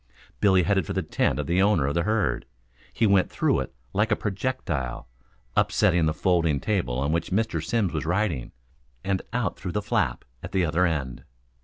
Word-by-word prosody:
Billy 95 -3 +4
headed 95 -1 +1
for - - -3
the - - -1
tent - - 0
of 75 - -2
the 90 +6 +2
owner 95 -8 +3
of 70 - 0
the 85 - +1
herd. 110 +3 0 0.4
He 115 - +1
went 100 -3 +4
through - - +1
it - - -4 0.2
like 110 +3 +1
a - - +5
projectile, 95 - -3 0.5
upsetting 85 -2 +3
the - - +2
folding 85 -5 +2
table 90 - -1
on 70 +3 0
which 85 0 -1
Mr. 110 +4 0
Simms 110 -8 0
was 75 - -2
writing, 85 - 0 0.5
and 95 -1 0
out 115 -5 -2
through 90 - -5
the 105 - +1
flap - - 0 0.2
at - - -8
the 95 -2 +2
other 85 +3 +2
end. 70 -7 -3
90 Hz, 190 wpm, -25 LUFS, 80-105 Hz, 0.5 s, a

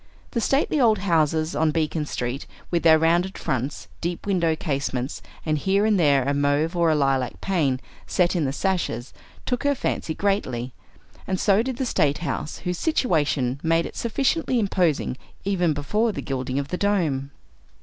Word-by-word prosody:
The 235 - -1
stately 275 +4 +2
old 220 -3 +5
houses 160 -4 +1
on 160 0 +2
Beacon 155 -1 -1
Street, 125 +1 -3 0.2
with 170 -1 +1
their 160 -1 +7
rounded 170 +4 +2
fronts, 135 -1 -3
deep 170 0 -3
window 175 -5 +2
casements, 140 -4 -2 0.2
and 155 -1 +1
here 195 +5 +2
and 210 -3 +3
there 140 -5 +4
a 140 +2 0
mauve 145 +4 +1
or 170 -1 +3
a 155 - +3
lilac 135 -3 0
pane 150 -9 0 0.3
set 180 0 +2
in 165 -4 +1
the 135 - 0
sashes, 150 - -2 0.3
took 250 -2 -1
her 285 0 +2
fancy 160 -9 -2
greatly; 130 - -1 0.5
and 185 -1 -1
so 200 0 +4
did 255 0 -3
the 265 - -1
State 150 - +2
House, 155 - -3
whose 180 -1 -2
situation 150 - +1
made 165 0 +2
it - - -8
sufficiently 265 +4 0
imposing, 175 - +1 0.3
even 180 -4 +2
before 210 +11 0
the - - -5
gilding 130 -1 -3
of 140 0 -2
the 180 - -2
dome. 165 -10 0
165 Hz, 170 wpm, -24 LUFS, 140-195 Hz, 0.5 s, their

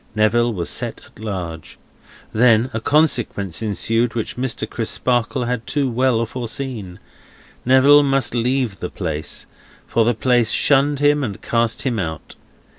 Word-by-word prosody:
Neville 115 +3 +2
was 90 -6 -3
set - - -2
at - - -20
large. 90 -7 -6 0.6
Then, 115 +2 +4
a 115 - -1
consequence 120 - +1
ensued 115 +3 0
which 115 - -3
Mr. 125 -1 -2
Crisparkle 120 +2 -1
had 120 -1 -3
too 140 -3 0
well 120 -1 +1
foreseen. 115 -5 -4 0.7
Neville 135 +3 +6
must 135 -4 +1
leave 120 -4 -1
the - - -4
place, 75 +1 -4 0.4
for 115 - +1
the 120 +1 +1
place 120 0 +2
shunned 145 0 +2
him 145 0 +3
and 105 -7 -4
cast 115 -1 0
him 125 -5 -1
out. 80 -4 -5
120 Hz, 140 wpm, -20 LUFS, 110-130 Hz, 0.7 s, Neville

